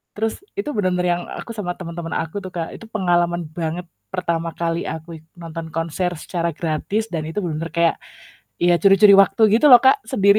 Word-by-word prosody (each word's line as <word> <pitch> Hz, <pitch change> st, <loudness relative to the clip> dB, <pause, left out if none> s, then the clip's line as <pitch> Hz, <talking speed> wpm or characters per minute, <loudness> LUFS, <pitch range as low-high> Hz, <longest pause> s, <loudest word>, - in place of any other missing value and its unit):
Terus 220 Hz, +1 st, -2 dB, 0.2 s
itu 350 Hz, -7 st, -2 dB
bener-bener 180 Hz, -3 st, 0 dB
yang -, -, -6 dB, 0.2 s
aku 230 Hz, -, -8 dB
sama 180 Hz, -4 st, -3 dB
temen-temen 170 Hz, -1 st, -6 dB
aku 165 Hz, +5 st, -6 dB
tuh 185 Hz, -, -7 dB
Kak 165 Hz, -2 st, -3 dB
itu 225 Hz, -, -12 dB
pengalaman 175 Hz, -4 st, +1 dB
banget 170 Hz, +2 st, -3 dB, 0.3 s
pertama 170 Hz, -2 st, -1 dB
kali 170 Hz, 0 st, -2 dB
aku 160 Hz, +1 st, -6 dB, 0.2 s
nonton 165 Hz, -1 st, -7 dB
konser 165 Hz, +2 st, -1 dB
secara 170 Hz, -2 st, -2 dB
gratis 170 Hz, +8 st, -2 dB
dan 155 Hz, -2 st, -2 dB
itu 165 Hz, -, -9 dB
bener-bener 165 Hz, 0 st, -4 dB
kayak 170 Hz, -1 st, +2 dB, 0.7 s
ya 175 Hz, 0 st, +5 dB
curi-curi 195 Hz, +1 st, +7 dB
waktu 195 Hz, +3 st, 0 dB, 0.2 s
gitu 300 Hz, -, +4 dB
loh 245 Hz, -1 st, +10 dB
Kak 265 Hz, 0 st, +4 dB
sendiri. 200 Hz, +1 st, +4 dB
175 Hz, 180 wpm, -21 LUFS, 165-195 Hz, 0.7 s, loh